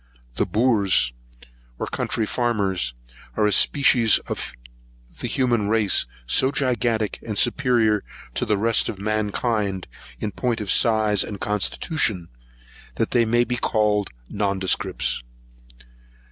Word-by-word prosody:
The - - -1
boors, 105 - +2 0.6
or - - -3
country 110 - -2
farmers, 100 - -1 0.4
are 105 - +3
a 105 - +2
species 120 0 +4
of - - -5 0.7
the - - -3
human 120 -4 0
race, 105 -3 +2 0.2
so 130 - +3
gigantic 120 -5 0
and 105 -3 -5
superior 120 -4 +2 0.3
to - - -2
the 105 - +1
rest 115 +2 +2
of 100 - -5
mankind, 105 -1 -1 0.3
in 105 - -3
point 120 +3 -2
of 105 -2 -1
size 110 -4 +3
and 100 -2 -7
constitution, 105 - -1 0.7
that - - -1
they 120 -1 +3
may 120 +2 +3
be 125 0 -3
called 105 -4 +1 0.2
nondescripts. 95 -10 -1
110 Hz, 120 wpm, -23 LUFS, 100-120 Hz, 0.7 s, species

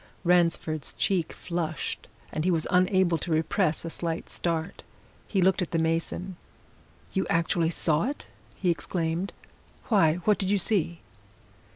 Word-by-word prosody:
Ransford's 170 -4 +2
cheek 180 -5 0
flushed, 170 -3 -4 0.2
and 155 - -2
he 185 - +2
was 165 -3 +1
unable 180 -2 +3
to 175 - -5
repress 160 +1 +1
a 165 - -4
slight 165 -1 -3
start. 165 -1 -2 0.5
He 190 -3 +1
looked 190 +1 +3
at 180 - -1
the 165 - 0
mason. 165 +3 -1 0.8
"You 190 - 0
actually 165 0 +2
saw 160 -1 +2
it!" 280 +3 -4 0.3
he 180 -3 +1
exclaimed. 165 +3 -2 0.6
"Why, 165 -9 +5
what 210 -1 +4
did 190 - -1
you 205 - +3
see?" 175 -4 0
170 Hz, 145 wpm, -27 LUFS, 160-185 Hz, 0.8 s, Why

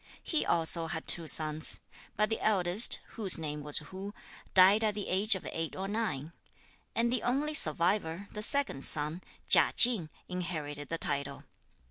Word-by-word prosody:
He 315 - -1
also 165 0 -2
had 160 0 -6
two 165 -2 +2
sons; 155 0 +2 0.4
but 215 +2 0
the 225 - -2
eldest, 195 0 +2
whose 205 -5 -2
name 150 -2 -5
was 145 0 +3
Hu, 190 +7 -7 0.4
died 195 +4 +6
at 210 -2 0
the 205 - -5
age 200 +4 +2
of 190 - -7
eight 165 -1 -4
or 190 +1 -5
nine; 190 -8 -3 0.6
and 235 +1 +1
the 250 - 0
only 285 +5 -1
survivor, 170 - +1
the 210 - -7
second 230 - -3
son, 155 +4 0 0.3
Chia - - +6
Ching, 225 -10 +6 0.2
inherited 155 -6 -5
the 165 - -3
title. 140 -3 -4
180 Hz, 160 wpm, -30 LUFS, 155-215 Hz, 0.6 s, died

